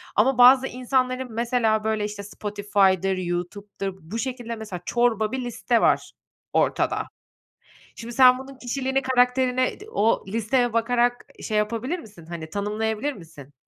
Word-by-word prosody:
Ama 255 Hz, +4 st, +3 dB
bazı 255 Hz, +2 st, +7 dB
insanların, 255 Hz, -1 st, -1 dB
mesela, 230 Hz, -2 st, +1 dB
böyle, 215 Hz, -1 st, 0 dB
işte, 205 Hz, -1 st, -6 dB
Spotify'dır, 200 Hz, -2 st, 0 dB
YouTube'dur 185 Hz, +2 st, -4 dB
bu 190 Hz, +9 st, -6 dB
şekilde, 240 Hz, -2 st, -4 dB
mesela, 205 Hz, -5 st, -7 dB
çorba 230 Hz, -3 st, +1 dB
bir 260 Hz, -, -2 dB
liste 240 Hz, 0 st, 0 dB
var -, -, +2 dB, 0.4 s
ortada. -, -, +1 dB, 0.9 s
Şimdi 235 Hz, +1 st, -8 dB
sen 255 Hz, -1 st, +7 dB
bunun 270 Hz, +1 st, -10 dB
kişiliğini, 265 Hz, +2 st, -1 dB
karakterine 255 Hz, 0 st, +2 dB
i -, -, -14 dB
o 225 Hz, -, +1 dB
listeye 230 Hz, +3 st, 0 dB
bakarak 240 Hz, +1 st, +1 dB
ı -, -, -11 dB
şey 215 Hz, -, -1 dB
yapabilir 230 Hz, +10 st, -1 dB
misin, 200 Hz, -, -14 dB
hani, 160 Hz, -1 st, -7 dB
tanımlayabilir 215 Hz, -, -2 dB
misin? 155 Hz, -, -13 dB
230 Hz, 140 wpm, -24 LUFS, 205-255 Hz, 0.9 s, bazı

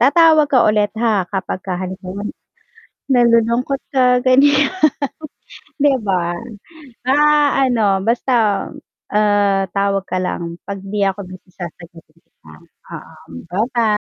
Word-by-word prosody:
tatawag 315 Hz, -1 st, +5 dB
ka 255 Hz, -4 st, +3 dB
ulit, 210 Hz, -1 st, +2 dB
ha, 215 Hz, -5 st, +1 dB
kapag 190 Hz, -1 st, -4 dB
ka 185 Hz, -1 st, -4 dB
halimbawa 185 Hz, +2 st, -6 dB
n -, -, -3 dB, 0.8 s
nalulungkot 240 Hz, +2 st, +2 dB, 0.2 s
ka, 250 Hz, -1 st, +4 dB
ganiyan, 275 Hz, +2 st, +4 dB, 1.1 s
'di 285 Hz, -2 st, +4 dB
ba? 175 Hz, -2 st, 0 dB, 0.7 s
Ah, 290 Hz, -1 st, +3 dB
ano 205 Hz, -5 st, +1 dB
basta, 240 Hz, +3 st, 0 dB, 0.8 s
uh, 205 Hz, -2 st, +2 dB
tawag 200 Hz, -1 st, 0 dB
ka 185 Hz, -, -2 dB
lang, 170 Hz, -2 st, -4 dB
'pag 200 Hz, 0 st, -4 dB
'di 200 Hz, +1 st, -4 dB
ako 190 Hz, -, -6 dB
busy, 185 Hz, 0 st, -13 dB
sasagutiin 170 Hz, -2 st, -11 dB
kita, 80 Hz, -, -20 dB, 0.4 s
oo. -, -, -11 dB, 0.3 s
Bye 205 Hz, +6 st, 0 dB
bye. 220 Hz, -3 st, +2 dB
210 Hz, 125 wpm, -18 LUFS, 190-255 Hz, 1.1 s, tatawag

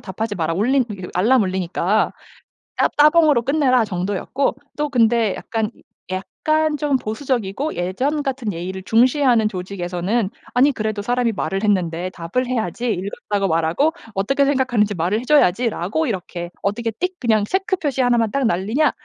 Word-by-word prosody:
답하지 210 Hz, +2 st, -4 dB
마라. 165 Hz, -2 st, -1 dB
올린 245 Hz, +9 st, +2 dB, 0.3 s
알람 225 Hz, +6 st, +4 dB
울리니까 185 Hz, +2 st, 0 dB, 0.7 s
따 -, -, +4 dB
따봉으로 300 Hz, -3 st, +5 dB
끝내라." 255 Hz, -3 st, +2 dB
정도였고 200 Hz, +8 st, -2 dB, 0.2 s
또 300 Hz, 0 st, -1 dB
근데 230 Hz, -4 st, +3 dB
약간 225 Hz, -1 st, -3 dB, 0.7 s
약간 310 Hz, 0 st, +2 dB
좀 290 Hz, -2 st, +1 dB
보수적이고 245 Hz, +2 st, -2 dB
예전 255 Hz, +13 st, -1 dB
같은 260 Hz, -6 st, -2 dB
예의를 185 Hz, +2 st, -5 dB
중시하는 240 Hz, +1 st, +3 dB
조직에서는 185 Hz, +2 st, -2 dB, 0.3 s
"아니 275 Hz, +4 st, +5 dB
그래도 215 Hz, -3 st, -3 dB
사람이 245 Hz, +1 st, +1 dB
말을 195 Hz, +1 st, -2 dB
했는데 180 Hz, -4 st, 0 dB
답을 185 Hz, +9 st, -3 dB
해야지. 235 Hz, -1 st, -1 dB
읽었다고 200 Hz, +1 st, -2 dB
말하고 165 Hz, -, +1 dB, 0.2 s
어떻게 275 Hz, +9 st, +1 dB
생각하는지 245 Hz, -7 st, +1 dB
말을 180 Hz, +6 st, 0 dB
해 -, -, -7 dB
줘야지."라고 240 Hz, -, +2 dB
이렇게 180 Hz, -4 st, -4 dB
"어떻게 225 Hz, +4 st, -1 dB
띡 235 Hz, -, 0 dB
체크 380 Hz, 0 st, 0 dB
표시 285 Hz, -6 st, -1 dB
1 245 Hz, -1 st, +3 dB
만 225 Hz, -2 st, +2 dB
딱 275 Hz, -2 st, 0 dB
날리냐?" 225 Hz, -, +1 dB
225 Hz, 350 characters per minute, -20 LUFS, 190-265 Hz, 0.7 s, 따봉으로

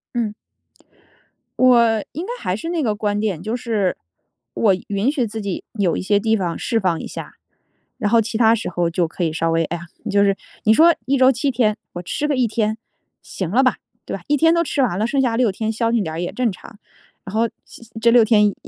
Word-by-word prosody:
嗯。 225 Hz, -3 st, -1 dB, 1.3 s
我 235 Hz, -4 st, +4 dB
应 330 Hz, +4 st, -4 dB
该 460 Hz, -, -5 dB
还 180 Hz, -, -1 dB
是 220 Hz, +11 st, -5 dB
那 340 Hz, -2 st, -1 dB
个 215 Hz, -6 st, 0 dB
观 205 Hz, 0 st, -1 dB
点， 200 Hz, -6 st, -2 dB
就 215 Hz, +3 st, -3 dB
是 220 Hz, -6 st, -1 dB, 0.6 s
我 200 Hz, -, +3 dB
允 205 Hz, +7 st, 0 dB
许 255 Hz, -6 st, -1 dB
自 220 Hz, +1 st, -6 dB
己 200 Hz, -3 st, -4 dB
有 200 Hz, -6 st, 0 dB
一 -, -, -3 dB
些 205 Hz, +2 st, +2 dB
地 220 Hz, +2 st, +1 dB
方 175 Hz, -3 st, -2 dB
释 230 Hz, -, 0 dB
放 180 Hz, -5 st, 0 dB
一 -, -, -6 dB
下。 -, -, -8 dB, 0.6 s
然 205 Hz, -, -1 dB
后 230 Hz, 0 st, +5 dB
其 220 Hz, 0 st, -3 dB
他 225 Hz, -1 st, +5 dB
时 225 Hz, -, -4 dB
候 175 Hz, -1 st, 0 dB
就 170 Hz, +1 st, 0 dB
可 175 Hz, +2 st, -3 dB
以 160 Hz, -, -1 dB
稍 165 Hz, +1 st, 0 dB
微， 165 Hz, 0 st, +1 dB
哎 170 Hz, -, -4 dB
呀， 170 Hz, -, -10 dB, 0.2 s
就 200 Hz, 0 st, +3 dB
是 195 Hz, -1 st, +2 dB, 0.3 s
你 220 Hz, -, +5 dB
说 330 Hz, +5 st, +6 dB
一 275 Hz, +3 st, +1 dB
周 260 Hz, 0 st, +6 dB
7 270 Hz, +3 st, -1 dB
天 225 Hz, -4 st, +1 dB, 0.2 s
我 175 Hz, -, -5 dB
吃 285 Hz, +11 st, -2 dB
个 285 Hz, -, +1 dB
1 245 Hz, -2 st, +2 dB
天 215 Hz, 0 st, -1 dB, 0.4 s
行 185 Hz, -4 st, -5 dB
了 250 Hz, +6 st, +4 dB
吧， 255 Hz, -, +3 dB, 0.3 s
对 -, -, -4 dB
吧？ -, -, -10 dB
1 295 Hz, 0 st, +2 dB
天 325 Hz, +3 st, +4 dB
都 335 Hz, 0 st, +2 dB
吃 290 Hz, -3 st, -1 dB
完 215 Hz, -9 st, +1 dB
了， 215 Hz, -, +1 dB
剩 270 Hz, +4 st, 0 dB
下 235 Hz, -3 st, +1 dB
6 235 Hz, -3 st, +2 dB
天 220 Hz, +3 st, -3 dB
消 230 Hz, +1 st, 0 dB
停 235 Hz, -1 st, +2 dB
点 160 Hz, -5 st, -4 dB
儿 165 Hz, -, -4 dB
也 175 Hz, -, -3 dB
正 250 Hz, -3 st, 0 dB
常。 205 Hz, +3 st, -11 dB, 0.5 s
然 195 Hz, +2 st, -7 dB
后 230 Hz, +1 st, +2 dB, 0.5 s
这 235 Hz, -, +5 dB
6 235 Hz, -1 st, +6 dB
天 210 Hz, -2 st, +4 dB
又 205 Hz, -, -1 dB
220 Hz, 240 characters per minute, -20 LUFS, 195-240 Hz, 1.3 s, 说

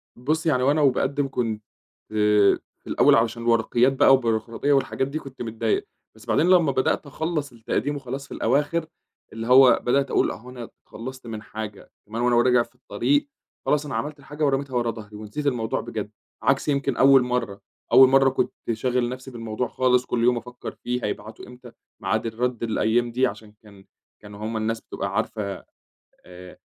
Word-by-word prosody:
بُصّ، 155 Hz, +7 st, -1 dB
يعني 130 Hz, -6 st, +2 dB
هو 135 Hz, -, +4 dB
أنا 150 Hz, +1 st, +1 dB
وباقدم 140 Hz, +1 st, +1 dB
كنت 115 Hz, -5 st, -3 dB, 0.5 s
في 105 Hz, -1 st, +3 dB, 0.3 s
الأول -, -, +4 dB
علشان 115 Hz, +1 st, +1 dB
الورقيات 120 Hz, +2 st, +3 dB
بقى 135 Hz, -, +5 dB
والبيروقراطية 115 Hz, +2 st, +1 dB
والحاجات 135 Hz, -1 st, 0 dB
دي، 145 Hz, +3 st, -4 dB
كنت 135 Hz, -3 st, -11 dB
متضايق 115 Hz, -1 st, -1 dB, 0.3 s
بس -, -, -16 dB
بعدين 170 Hz, -, +2 dB
لمّا 175 Hz, -6 st, +5 dB
بدأت 130 Hz, +3 st, 0 dB
أخلّص 155 Hz, 0 st, -3 dB
التقديم 120 Hz, +5 st, -2 dB
وخلاص 135 Hz, 0 st, -6 dB
في -, -, -9 dB
الأواخر 145 Hz, +7 st, 0 dB, 0.5 s
اللي 115 Hz, +1 st, -5 dB
هو 130 Hz, 0 st, +7 dB
بدأت 135 Hz, +2 st, +1 dB
أقول -, -, +2 dB
أهو 125 Hz, +4 st, -10 dB
أنا 120 Hz, -2 st, -8 dB, 0.2 s
تخلصت 130 Hz, +2 st, -9 dB
من 110 Hz, -2 st, -6 dB
حاجة، 105 Hz, -1 st, -8 dB
كمان 110 Hz, +3 st, -5 dB
وأنا 120 Hz, 0 st, +3 dB
راجع 125 Hz, -1 st, +4 dB
في -, -, -22 dB
الطريق 290 Hz, 0 st, 0 dB, 0.4 s
خلاص 150 Hz, 0 st, +1 dB
أنا 145 Hz, -, -5 dB
عملت 150 Hz, 0 st, -4 dB
الحاجة 150 Hz, +2 st, -3 dB
ورميتها 135 Hz, -1 st, -1 dB
ورا 120 Hz, -1 st, +1 dB
ضهري 105 Hz, -2 st, -11 dB
ونسيت 110 Hz, +8 st, -5 dB
الموضوع 120 Hz, -5 st, -1 dB
بجد، -, -, -5 dB, 0.3 s
عكس -, -, +2 dB
يمكن 140 Hz, -3 st, 0 dB
أول 135 Hz, -1 st, +6 dB
مرة 125 Hz, -5 st, -2 dB, 0.3 s
أول 130 Hz, 0 st, +8 dB
مرة 135 Hz, 0 st, +5 dB
كنت 130 Hz, -, -1 dB, 0.2 s
شاغل 120 Hz, +2 st, 0 dB
نفسي 130 Hz, +1 st, -8 dB
بالموضوع 115 Hz, 0 st, -3 dB
خالص 125 Hz, +1 st, +2 dB
كل 120 Hz, -2 st, -1 dB
يوم 125 Hz, 0 st, +3 dB
أفكر 125 Hz, +1 st, -7 dB
فيه 125 Hz, 0 st, -2 dB
هيبعتوا 105 Hz, +1 st, -6 dB
إمتى، 125 Hz, -1 st, -13 dB, 0.3 s
ميعاد -, -, -1 dB
الرد 120 Hz, +1 st, -2 dB
الأيام 115 Hz, +1 st, +1 dB
دي 130 Hz, +2 st, +2 dB
عشان 105 Hz, -1 st, -9 dB
كان 100 Hz, -2 st, -17 dB, 0.4 s
كانوا 105 Hz, -1 st, -12 dB
هُم 110 Hz, 0 st, -3 dB
الناس 115 Hz, +1 st, -2 dB
بتبقى -, -, -5 dB
عارفة 100 Hz, -3 st, -3 dB, 0.6 s
آآ 90 Hz, 0 st, -12 dB
125 Hz, 175 wpm, -24 LUFS, 110-135 Hz, 0.6 s, أول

